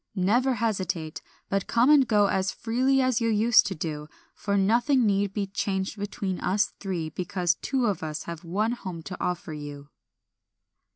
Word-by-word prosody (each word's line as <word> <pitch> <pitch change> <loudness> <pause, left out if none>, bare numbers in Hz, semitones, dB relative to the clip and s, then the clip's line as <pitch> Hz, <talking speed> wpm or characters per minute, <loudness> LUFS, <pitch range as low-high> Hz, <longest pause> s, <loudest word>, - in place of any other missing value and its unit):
Never 240 +8 +2
hesitate, 190 -8 -2 0.3
but 195 0 -1
come 240 +5 +4
and 280 -4 +6
go 210 -3 +4
as 190 -1 0
freely 260 +4 +1
as 255 -2 +1
you 230 - +1
used 220 +1 +5
to 195 - -3
do, 150 -2 -5 0.3
for 200 -1 -1
nothing 240 +6 +3
need 200 -1 +1
be 200 0 -2
changed 195 0 -2
between 200 -2 -4
us 195 +3 0
three 175 -5 -3
because 180 +1 0
two 265 -3 0
of 200 -6 0
us 155 -1 -4
have 170 0 -7
one 205 +7 0
home 185 -8 -6
to 180 - -6
offer 175 -3 -3
you." 145 -1 -8
195 Hz, 170 wpm, -26 LUFS, 180-230 Hz, 0.3 s, and